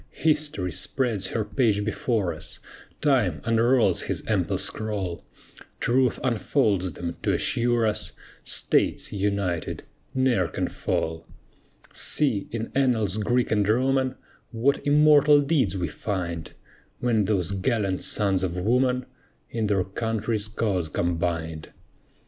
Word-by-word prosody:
History 150 - 0
spreads 110 - -1
her 110 0 -2
page 105 -2 +1
before 110 -4 -1
us, 80 - -7 0.4
Time 120 - +2
unrolls 115 +1 +3
his - - -3
ample - - 0
scroll; 100 -5 -2 0.6
Truth 125 0 +2
unfolds 105 - +1
them, 85 +2 -5
to - - +1
assure 120 -1 +1
us, 105 -1 -1 0.3
States, - - +1
united, 100 -4 -2 0.3
ne'er 125 -9 +2
can - - -3
fall. 80 0 -3 0.7
See, 130 -10 +1
in 115 0 -4
annals 115 -7 +2
Greek 120 +3 +1
and 105 -2 +2
Roman, 130 +2 +2 0.3
What 125 +4 +1
immortal 150 0 +6
deeds 135 - +1
we 90 -2 -1
find; 85 -1 -4 0.5
When 115 -4 +1
those 95 -4 0
gallant 100 -1 0
sons 95 -3 +1
of 90 -1 -2
woman 125 +6 +1 0.5
In 110 -2 -1
their 100 -2 +2
country's 110 +2 -2
cause 100 -7 -1
combined. 85 -2 -2
110 Hz, 120 wpm, -25 LUFS, 95-125 Hz, 0.7 s, immortal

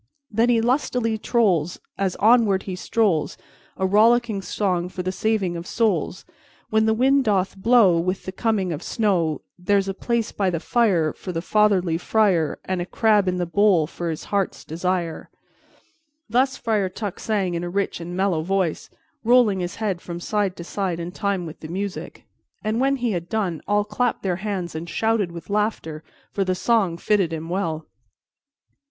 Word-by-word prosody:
Then 225 +3 +2
he 235 -2 +4
lustily 240 -2 0
trolls 185 -9 +1 0.2
As 195 -2 -1
he - - -13
onward 215 -3 +4
strolls, 185 -3 0 0.4
A 190 - 0
rollicking 220 +1 +3
song 180 -2 -1
for 180 0 -5
the 185 - -1
saving 195 -2 0
of 170 +1 -6
souls. 200 -5 0 0.5
When 220 0 +3
the 220 - +3
wind 270 +3 +3
doth 195 -3 +1
blow, 195 -4 +4
With 185 +3 -2
the 185 - -4
coming 195 -4 0
of 150 - -5
snow, 175 - 0 0.2
There's 195 +1 +1
a 195 - -1
place 235 +3 -1
by 195 -2 0
the 170 -2 -2
fire 180 -8 +2
For 185 - -7
the 165 -1 -3
fatherly 185 -6 +2
friar, 185 -6 +2
And 185 -1 -2
a 175 - -4
crab 210 -3 +3
in 180 0 0
the 180 - 0
bowl 185 -2 +3
for 170 +2 -5
his 160 -1 -4
heart's 200 -2 -2
desire_." 170 0 -2 1.0
Thus 255 +4 +1
Friar 210 -4 0
Tuck 205 0 -5
sang 200 -5 -1
in 170 0 -2
a 175 - -3
rich 200 0 -1
and 175 +2 -6
mellow 190 -4 +1
voice, 185 -1 -1 0.3
rolling 235 -4 +4
his 175 -1 -3
head 200 -6 -2
from 170 -1 -6
side 200 0 -1
to 170 - -8
side 180 -1 -3
in 170 +1 -5
time 195 -1 -2
with 160 0 -9
the 155 - -8
music, 190 +3 -5 0.4
and 215 +2 0
when 275 +1 +3
he 245 -3 -1
had 175 -3 -4
done, 195 -8 -1
all 205 0 +2
clapped 235 +3 -1
their 180 -3 0
hands 190 -3 -3
and 160 +2 -6
shouted 220 -4 0
with 170 +3 -9
laughter, 205 -7 -1 0.3
for 200 - 0
the 185 -1 0
song 195 -4 +1
fitted 195 -2 +1
him 165 0 -5
well. 165 -4 -2
195 Hz, 180 wpm, -23 LUFS, 175-220 Hz, 1.0 s, he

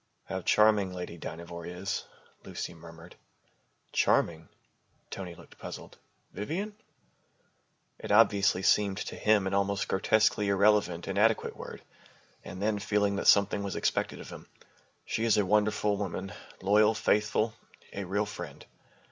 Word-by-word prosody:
"How 95 - -4
charming 105 0 +3
Lady 90 -2 -6
Dynevor 85 +1 -7
is," 90 +3 -4 0.4
Lucy - - -6
murmured. 85 +1 -13 0.8
"Charming?" 80 -1 +1 0.6
Tony 90 -3 -6
looked - - -17
puzzled. - - -9 0.3
"Vivian?" 190 - -4 1.2
It - - -5
obviously 100 -3 +4
seemed 100 -2 +3
to - - -5
him 105 -2 +3
an 95 - -2
almost 100 0 0
grotesquely 105 +1 +2
irrelevant, 100 -3 +2
inadequate 105 +3 +1
word. - - -9 0.6
And 95 - -8
then, 105 +1 0
feeling 100 -1 +1
that - - -2
something 100 0 +5
was 100 -2 -4
expected - - -1
of - - -10
him, - - -11 0.6
"She 110 - -2
is 115 -2 +3
a 105 - +3
wonderful 105 +1 +2
woman, 95 0 -4 0.3
loyal, 105 +3 +4
faithful, 105 0 +1 0.4
a 100 - -4
real 100 +3 0
friend." 105 - -8
100 Hz, 130 wpm, -29 LUFS, 95-105 Hz, 1.2 s, something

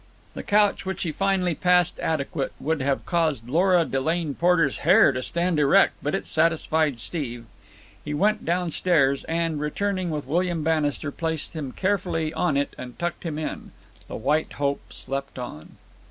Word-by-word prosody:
The - - -6
couch 205 0 +2
which 190 -1 -3
he 165 - -2
finally 190 0 +1
passed 180 +2 +2
adequate 140 -2 -2
would 160 -1 -1
have 135 0 -1
caused 155 -9 0
Lora 175 +4 +3
Delane 155 +3 -1
Porter's 165 -3 +2
hair - - +5
to 130 - -3
stand 170 +3 0
erect, 140 -2 +5
but 145 - -1
it - - -3
satisfied 160 -3 +1
Steve. 120 -3 -4 0.6
He 150 - -5
went 210 +7 +1
downstairs, 165 -5 +1
and, 165 -2 -1
returning 185 +4 -1
with 150 -3 -3
William 170 +2 0
Bannister, 150 -2 0
placed 160 +1 -3
him 145 -5 -4
carefully 180 -4 -1
on 165 -5 +1
it 140 - -1
and 125 -1 -8
tucked 175 0 -3
him 155 -3 -3
in. 155 - -5 0.3
The - - -7
White 150 +7 0
Hope 140 -1 -2
slept 135 +1 -4
on. 120 -12 -8
160 Hz, 160 wpm, -24 LUFS, 140-175 Hz, 0.6 s, hair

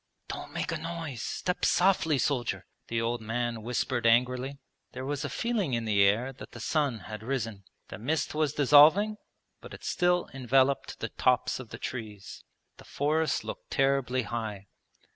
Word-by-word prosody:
'Don't - - -6
make - - -3
a - - -2
noise. 165 -7 -5
Step 180 -1 -3
softly, 175 -5 +3
soldier!' 125 -2 -1 0.2
the 115 - -1
old 115 +1 -1
man 115 +1 -2
whispered 120 +1 0
angrily. 125 +4 +2 0.4
There 130 +1 -5
was 145 0 -2
a - - -2
feeling 210 - -1
in 115 -1 -2
the 105 -2 +3
air 110 +7 +3
that 130 - -12
the 120 - -9
sun 135 -2 0
had 105 +2 -8
risen. 115 -5 -3 0.2
The - - -8
mist 150 +8 -1
was 150 -2 +1
dissolving 155 +10 +6 0.4
but - - -10
it - - -15
still 180 0 +1
enveloped 135 +1 +1
the - - -2
tops 125 0 +1
of 125 -4 -9
the 115 - -7
trees. 110 -5 -7 0.3
The - - -13
forest 155 +2 0
looked - - -7
terribly 135 -2 +1
high. 105 -3 -5
130 Hz, 165 wpm, -29 LUFS, 115-150 Hz, 0.4 s, dissolving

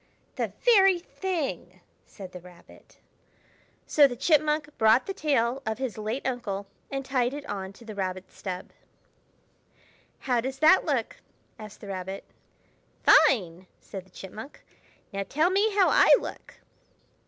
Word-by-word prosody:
"The - - -3
very 390 -6 +6
thing!" 295 - -4 0.3
said 190 -2 -11
the 180 - -9
Rabbit. 175 0 -18 0.9
So 290 -2 +5
the 245 - -6
Chipmunk 300 +2 +1
brought 220 +3 +5
the 390 - -4
tail 270 -6 0
of 220 -2 -3
his 260 -3 -3
late 220 +5 -4
uncle 225 -6 -3 0.2
and 275 -1 -4
tied 255 -1 0
it 290 0 -7
on 195 -4 -5
to 230 - -16
the 220 - -7
Rabbit's 185 -2 -5
stub. 185 -2 -6 1.5
"How 245 -3 +1
does 265 +2 -4
that 315 +6 +5
look?" - - -1 0.4
asked 215 -1 -11
the 205 - -9
Rabbit. 190 0 -5 0.8
"Fine!" 190 - +4
said 195 -3 -9
the 190 - -24
Chipmunk. 215 +9 -10 0.5
"Now 195 - -2
tell 315 +5 +2
me 405 +2 +2
how 390 -3 +5
I - - +5
look!" - - -9
245 Hz, 140 wpm, -27 LUFS, 195-300 Hz, 1.5 s, very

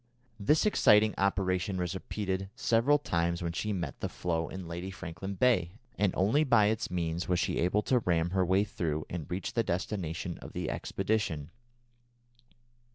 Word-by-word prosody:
This 150 - +3
exciting 105 - +5
operation 95 -1 +1
was 90 -1 -2
repeated 95 0 -3
several 120 +6 +3
times 85 -9 -1
when 85 - -1
she 105 +5 -2
met 90 -4 -3
the - - -2
floe 80 -2 -2
in 95 -2 -7
Lady 85 +3 -5
Franklin 95 +1 -6
Bay, 90 -7 +2 0.2
and 100 -2 +2
only 110 +11 +3
by 120 -7 +5
its 110 0 -1
means 85 -1 -2
was 90 -1 +2
she - - 0
able 90 +5 +2
to 125 - +3
ram 85 -4 +1
her 95 0 +2
way 95 +3 +3
through 80 -7 -3
and 85 -4 -5
reach 90 +2 -3
the 115 - +2
destination 85 -3 -3
of - - -10
the - - -2
expedition. 95 -7 -2
95 Hz, 165 wpm, -30 LUFS, 85-105 Hz, 0.2 s, exciting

